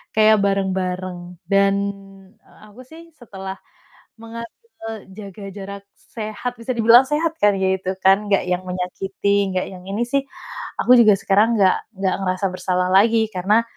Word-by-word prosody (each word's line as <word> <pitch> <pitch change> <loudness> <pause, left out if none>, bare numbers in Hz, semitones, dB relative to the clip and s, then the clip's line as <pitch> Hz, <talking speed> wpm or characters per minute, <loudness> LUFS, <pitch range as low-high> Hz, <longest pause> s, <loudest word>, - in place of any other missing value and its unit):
kayak 215 -1 +5
bareng-bareng 185 -2 -2
dan 195 0 +3 0.9
aku 220 +5 -14
sih 330 +2 -14
setelah 195 -6 -8 0.7
menga 230 0 -8 0.5
eee, 220 -1 -5
jaga 200 0 -10
jarak 200 0 -8
sehat 220 +2 -6
bisa 255 +2 -3
dibilang 235 +3 +6
sehat 320 +2 0
kan 205 0 +5
kayak 190 0 0
gitu 185 - -1
kan, 195 +2 +4
nggak 195 - +3
yang 180 0 -1
menyakiti 195 +2 -1
nggak 185 - -1
yang 180 -1 -11
ini 205 +5 -2
sih, 275 +1 0 0.6
aku 250 - +5
juga 215 -3 +6
sekarang 215 +4 +2
nggak 190 -2 +4 0.2
nggak 190 -1 0
ngerasa 185 +1 -1
bersalah 180 0 -1
lagi 220 +2 +4
karena 205 +5 +2
200 Hz, 150 wpm, -20 LUFS, 190-225 Hz, 0.9 s, dibilang